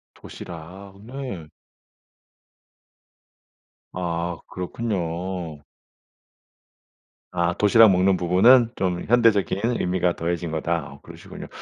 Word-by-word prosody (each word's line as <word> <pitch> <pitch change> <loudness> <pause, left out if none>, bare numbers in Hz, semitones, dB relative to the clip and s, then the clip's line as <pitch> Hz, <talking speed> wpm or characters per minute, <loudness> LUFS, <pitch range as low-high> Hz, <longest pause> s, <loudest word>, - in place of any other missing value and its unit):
도시락. 90 +4 -11
네. 125 - -7 2.5
아. 85 -1 -3
그렇군요. 90 -4 -4 1.7
아 85 -1 0
도시락 105 +2 +5
먹는 95 +1 +3
부분은 115 +8 +5
좀 90 -2 -2
현대적인 110 -5 +3 0.2
의미가 90 -1 0
더해진 85 0 -3
거다. 80 +1 -1 0.2
아 - - -17
그러시군요. - - -11
90 Hz, 190 characters per minute, -23 LUFS, 85-100 Hz, 2.5 s, 도시락